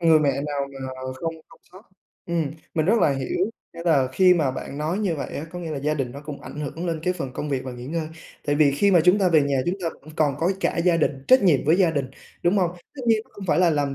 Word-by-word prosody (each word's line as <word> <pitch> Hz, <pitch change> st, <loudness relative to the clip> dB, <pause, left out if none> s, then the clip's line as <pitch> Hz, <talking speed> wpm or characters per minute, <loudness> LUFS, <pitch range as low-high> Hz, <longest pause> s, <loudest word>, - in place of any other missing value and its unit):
Người 165 Hz, -2 st, +6 dB
mẹ 145 Hz, -, +3 dB, 0.2 s
nào 140 Hz, -1 st, -2 dB
mà 130 Hz, 0 st, -5 dB
không 165 Hz, -1 st, -2 dB
không -, -, -19 dB
xót. 190 Hz, +4 st, -14 dB, 0.4 s
Ừm, 165 Hz, -4 st, -1 dB, 0.2 s
mình 155 Hz, -1 st, +1 dB
rất 225 Hz, +5 st, +4 dB
là 150 Hz, -, +4 dB
hiểu, 135 Hz, -, -1 dB, 0.2 s
nghĩa 170 Hz, -, -8 dB
là 140 Hz, -7 st, +3 dB
khi 180 Hz, +5 st, +5 dB
mà 155 Hz, -6 st, +1 dB
bạn 135 Hz, +2 st, -6 dB
nói 160 Hz, +6 st, -1 dB
như 195 Hz, -6 st, 0 dB
vậy 140 Hz, -, -4 dB
á, 145 Hz, -, -4 dB
có 180 Hz, -, -7 dB
nghĩa 165 Hz, -2 st, -5 dB
là 150 Hz, -, -3 dB
gia 150 Hz, +2 st, 0 dB
đình 135 Hz, -5 st, -3 dB
nó 140 Hz, -, -8 dB
cũng 150 Hz, -1 st, -8 dB
ảnh 150 Hz, -, -8 dB
hưởng 160 Hz, +4 st, -4 dB
lên 165 Hz, -2 st, -2 dB
cái 180 Hz, -, +1 dB
phần 135 Hz, -8 st, -5 dB
công 150 Hz, -, -4 dB
việc 135 Hz, -2 st, -2 dB
và 130 Hz, -, -5 dB
nghỉ 125 Hz, 0 st, -8 dB
ngơi, 160 Hz, +1 st, -3 dB, 0.4 s
tại 145 Hz, -, +2 dB
vì 145 Hz, -2 st, +5 dB
khi 200 Hz, +9 st, +3 dB
mà 180 Hz, -3 st, +6 dB
chúng 180 Hz, +3 st, +5 dB
ta 190 Hz, -3 st, +3 dB
về 160 Hz, -2 st, +5 dB
nhà 140 Hz, -1 st, 0 dB
chúng 175 Hz, -, +1 dB
ta 165 Hz, -, 0 dB
vẫn 155 Hz, -, -13 dB
còn 150 Hz, -3 st, +2 dB
có 170 Hz, +3 st, +2 dB
cả -, -, 0 dB
gia 170 Hz, 0 st, +3 dB
đình, 140 Hz, -4 st, -1 dB
trách 260 Hz, -2 st, +7 dB
nhiệm 165 Hz, -8 st, +4 dB
với 155 Hz, +4 st, +4 dB
gia 185 Hz, -3 st, +4 dB
đình, 140 Hz, -4 st, -2 dB, 0.3 s
đúng 180 Hz, +4 st, +3 dB
hông? 180 Hz, -3 st, +2 dB, 0.2 s
Tất 265 Hz, -, -8 dB
nhiên 225 Hz, -1 st, +4 dB
nó -, -, -29 dB
hông 200 Hz, -, -8 dB
phải 170 Hz, -, +2 dB
là 180 Hz, -2 st, +5 dB
làm 145 Hz, -2 st, 0 dB
155 Hz, 295 wpm, -24 LUFS, 140-175 Hz, 0.4 s, trách